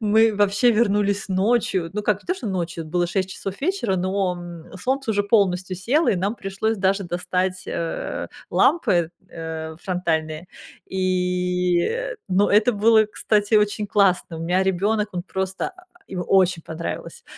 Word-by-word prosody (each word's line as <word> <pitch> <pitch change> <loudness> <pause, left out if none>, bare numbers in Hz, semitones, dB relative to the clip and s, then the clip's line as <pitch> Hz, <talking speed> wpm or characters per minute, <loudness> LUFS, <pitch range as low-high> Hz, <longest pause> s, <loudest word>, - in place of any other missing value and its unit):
Мы 220 0 +4
вообще 205 +4 +3
вернулись 205 -2 +1
ночью, 190 -3 +1
ну 210 +1 -3
как, 210 -1 0
не - - -26
то, 365 - +1
что 250 - -7
ночью, 175 -3 -3
было 175 +2 0
6 190 +1 -1
часов 195 0 -5
вечера, 295 - 0
но, 185 0 0
м, 175 -2 -10
солнце 265 +1 -1
уже 205 -1 +2
полностью 190 -3 +1
село, 270 - +1
и 190 - +3
нам 200 +5 -1
пришлось 205 +2 -2
даже 195 0 +1
достать, 180 +1 -2
э, 165 -1 -3 0.2
лампы, 185 - +3 0.2
э, 160 -1 -6
фронтальные, 160 -3 -2 0.4
и, 180 -1 0
э, - - -2
ну 195 +2 +3
это 215 +4 +4
было, 220 +1 +5
кстати, 210 0 0
очень 210 0 +2
классно. 190 -5 +2
У - - -7
меня 180 +3 +1
ребёнок, 205 +3 +1
он 175 - -3
просто, 190 0 -3
а, 365 - -17 0.2
ему 180 -2 -3
очень 185 -3 +3
понравилось. 160 +1 -6
190 Hz, 160 wpm, -23 LUFS, 180-210 Hz, 0.4 s, было